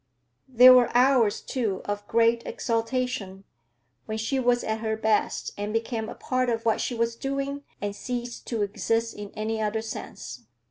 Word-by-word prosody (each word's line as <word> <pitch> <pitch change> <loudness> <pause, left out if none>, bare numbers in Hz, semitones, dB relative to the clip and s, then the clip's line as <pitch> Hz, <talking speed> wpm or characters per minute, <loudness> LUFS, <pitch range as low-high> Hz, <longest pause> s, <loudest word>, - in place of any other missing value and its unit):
There 255 0 +8
were 250 -2 +5
hours, 250 -5 +4
too, 225 -8 -2
of 205 0 -4
great 230 0 +3
exaltation; 230 -4 -2 0.6
when 220 0 -3
she 220 +5 -1
was 245 -1 +2
at 220 0 -2
her 220 -1 -2
best 220 -1 0
and 205 +1 -2
became 225 0 -2
a - - -7
part 255 -1 -1
of 230 -1 -2
what 225 - +2
she 245 - -2
was 230 0 0
doing 275 +2 -3 0.2
and 205 0 -3
ceased 240 +1 -5
to 225 -4 -1
exist 225 +3 -1
in 205 -1 -8
any 220 +1 -2
other 215 +1 -1
sense. 125 - -8
230 Hz, 170 wpm, -26 LUFS, 215-250 Hz, 0.6 s, There